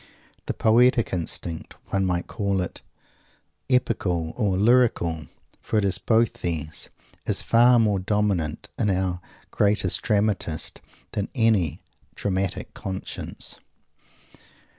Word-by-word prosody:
_ - - -22 0.4
The - - -2
poetic 120 +1 +4
instinct 85 -1 -4
one 95 -1 +1
might 90 -1 0
call 100 -3 -1
it 90 - -4 0.9
"epical" 90 -10 +1
or 100 -6 +1
"lyrical," 100 - +3 0.3
for 110 - -1
it 105 - +2
is 95 0 +1
both 110 +3 +2
these 80 -3 -2 0.4
is - - 0
far 120 +2 +6
more 105 -4 +3
dominant 95 -5 -1
in 105 - +2
our 90 -2 0 0.3
"greatest 100 -3 +2
dramatist" 105 -7 -1 0.3
than 100 -1 -2
any 110 - +2 0.3
dramatic 95 -1 -2
conscience. 95 -1 -5
100 Hz, 115 wpm, -25 LUFS, 90-110 Hz, 0.9 s, far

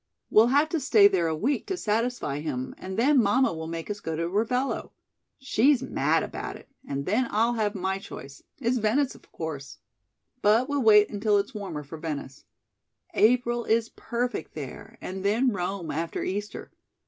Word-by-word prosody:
We'll 220 +2 +6
have 285 +5 +3
to 325 - 0
stay 220 -7 +6
there 185 -4 +1
a 160 - 0
week 250 - -1
to 380 - -2
satisfy 225 - -1
him, 130 -4 -4
and 190 +1 -6
then 265 +3 +5
mamma 220 +2 +3
will 160 0 -5
make 165 0 -5
us 205 -1 -4
go 160 -4 -4
to 165 +1 -1
Ravello. 230 +8 -1 0.4
She's 265 0 +2
mad - - +1
about - - -5
it; - - -14 0.2
and 140 0 -3
then 230 +7 +1
I'll 230 +3 +2
have 215 -2 -1
my 190 0 -1
choice 140 -7 -10 0.2
it's 250 -1 +1
Venice, 250 +6 +1
of - - -19
course; 150 -4 -6 0.6
but 220 +5 +4
we'll 285 -1 0
wait 210 -3 +6
until 205 0 +2
it's 200 +5 -1
warmer 190 -8 -5
for 155 +3 -9
Venice. 145 -3 -6 0.7
April 240 +1 +3
is 225 0 +2
perfect 245 +1 -4
there, - - -8
and 190 +1 -5
then 230 +6 +2
Rome 185 -2 -3
after 165 +3 -3
Easter. 205 +2 -4
210 Hz, 175 wpm, -27 LUFS, 170-245 Hz, 0.7 s, We'll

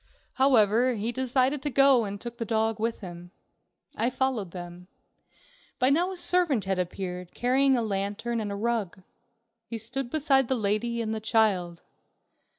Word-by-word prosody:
However, 250 -2 +3
he 220 +2 -2
decided 260 +2 0
to 290 - -2
go, 275 -3 +5
and 200 0 -5
took 235 +2 -8
the - - -1
dog 225 -1 0
with 225 +1 -2
him. 175 -2 -9 0.7
I 235 - +1
followed 255 -7 -1
them. 175 0 -9 0.9
By 255 +2 +3
now 350 +6 +2
a 375 - -6
servant 345 - +2
had 190 -1 -1
appeared, 180 0 -5
carrying 265 +2 +3
a 235 - 0
lantern 205 +3 -2
and 210 -2 -3
a - - -3
rug. 205 -4 -2 0.6
He 230 - -4
stood 240 +4 -5
beside 270 -3 +2
the 260 - +1
lady 230 +2 -1
and 220 0 -3
the 220 - -3
child. 200 -6 +1
230 Hz, 160 wpm, -27 LUFS, 200-260 Hz, 0.9 s, go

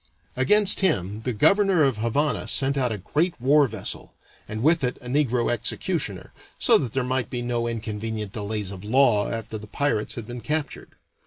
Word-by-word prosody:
Against 200 +10 +4
him 105 - 0
the 125 - 0
governor 195 - +3
of 135 -5 +1
Havana 125 +6 0
sent 135 +1 +1
out 125 -3 0
a 110 - -3
great 155 - -1
war 140 +3 +4
vessel, 110 -4 -4 0.3
and 110 +2 -5
with 160 +1 +3
it 125 0 -1
a - - -17
negro 125 -3 +1
executioner, 120 - -1 0.2
so - - +5
that 120 -5 -4
there 135 - 0
might 130 0 -1
be 120 -2 -4
no 120 -1 -1
inconvenient 110 -2 -4
delays 105 -2 -3
of 95 -1 -9
law 110 -2 +3
after 110 -1 -5
the 105 - -11
pirates 125 -3 -1
had 115 - -6
been 120 +1 -7
captured. 150 +4 -3
120 Hz, 180 wpm, -24 LUFS, 110-140 Hz, 0.3 s, so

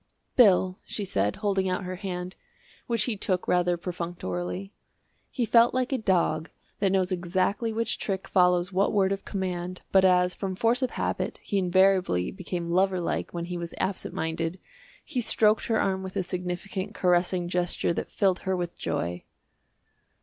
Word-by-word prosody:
"Bill," 190 -5 +5
she 205 - -4
said, 100 - 0
holding 195 -3 0
out 185 +1 -1
her 185 0 -5
hand, 180 -1 -5 0.5
which 230 -4 +1
he 230 -1 -1
took 185 -2 -1
rather 180 0 +2
perfunctorily. 170 - -4 0.6
He 245 - -1
felt 235 +2 +5
like 255 0 0
a 260 - +1
dog 170 -6 +1 0.3
that 195 -2 +2
knows 190 -1 +1
exactly 185 +5 0
which 225 0 -1
trick 190 -2 -3
follows 180 0 +3
what 195 +2 +2
word 195 -2 +3
of 195 0 -3
command, 185 -2 -4
but 190 -1 +5
as, 180 -1 +4
from 190 -2 -4
force 230 +6 +2
of 255 - +1
habit, - - -2
he 200 - 0
invariably 185 - +3
became 175 -3 -4
lover 185 +1 +2
like 170 - -2
when 170 -1 -4
he 175 0 -4
was 170 -1 -6
absent 190 0 -2
minded, 165 +2 -2 0.5
he 250 - -2
stroked 220 -1 +3
her 225 -1 +2
arm 190 -1 0
with 190 0 -7
a 195 - 0
significant 185 +3 -4
caressing 180 0 +2
gesture 175 -1 0
that - - -4
filled 190 -3 +1
her 190 -1 -1
with 175 -1 -4
joy. 90 +1 -3
185 Hz, 170 wpm, -27 LUFS, 175-195 Hz, 0.6 s, Bill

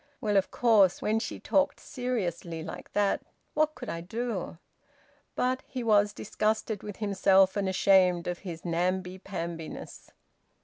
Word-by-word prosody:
Well, 210 -1 0
of 195 -1 +3
course, 210 -6 +4
when 215 +1 +1
she 225 - -5
talked 285 0 +1
seriously 180 - -3
like 160 - -8
that, 205 -1 +2 0.3
what 310 0 +1
could 250 - -8
I 170 - -4
do?" 215 -1 -4 0.8
But 255 +1 0
he 255 -2 -4
was 210 -2 +4
disgusted 215 0 -1
with 205 -2 -7
himself 195 -2 +4
and 200 -2 0
ashamed 185 -2 +4
of 175 -1 -3
his 170 -4 -8
namby 180 +2 -1
pambiness. 170 -4 -6
195 Hz, 140 wpm, -29 LUFS, 180-220 Hz, 0.8 s, course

